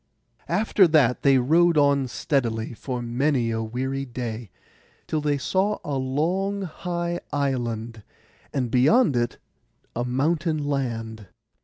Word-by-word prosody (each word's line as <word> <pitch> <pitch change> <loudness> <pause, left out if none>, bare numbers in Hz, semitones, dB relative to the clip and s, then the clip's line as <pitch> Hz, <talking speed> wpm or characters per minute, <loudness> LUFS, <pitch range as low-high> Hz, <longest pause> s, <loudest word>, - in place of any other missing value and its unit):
After 195 +1 +4
that 145 -6 +3
they 135 -1 +5
rowed 165 +6 +4
on 140 -2 +3
steadily 120 -4 -1
for 125 +1 -5
many 120 0 0
a 115 0 -1
weary 130 +5 -3
day, 120 -4 -5 0.6
till 155 - -1
they 145 -1 +1
saw 195 +9 0
a 145 - -3
long 170 +10 -1
high 175 0 -3
island, 120 -5 -2 0.5
and 125 -4 -2
beyond 145 - +4
it 120 0 0 0.6
a 120 - -1
mountain 155 +6 0
land. 115 -7 -3
135 Hz, 125 wpm, -24 LUFS, 120-160 Hz, 0.6 s, they